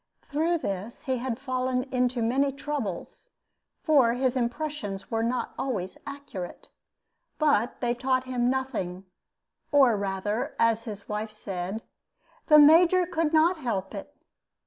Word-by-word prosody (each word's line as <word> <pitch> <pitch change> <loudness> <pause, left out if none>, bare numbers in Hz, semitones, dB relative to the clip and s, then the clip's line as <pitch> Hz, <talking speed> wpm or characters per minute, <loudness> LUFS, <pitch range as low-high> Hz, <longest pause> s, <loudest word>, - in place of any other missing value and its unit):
Through 320 +4 0
this 200 - -5
he 260 -2 -1
had 245 -2 -3
fallen 255 -1 -1
into 250 -1 +1
many 270 +5 +2
troubles, 275 -10 -5 0.5
for 275 -7 +4
his 255 +1 0
impressions 240 -5 -3
were 225 0 0
not 240 +2 -1
always 195 -9 -2
accurate; 280 -11 -8 0.7
but 285 -7 +2
they 240 -1 +1
taught 255 +1 0
him 250 -1 0
nothing, 195 -9 -3 0.7
or 270 -6 +5
rather, 200 +2 -2
as 230 0 +2
his 205 -3 -7
wife 215 +1 -3
said, 195 0 -5 0.6
"the 300 - +8
Major 335 +5 +7
could 330 -3 -1
not 330 +3 +4
help 225 -9 -3
it." 200 +7 -7
250 Hz, 130 wpm, -27 LUFS, 215-285 Hz, 0.7 s, the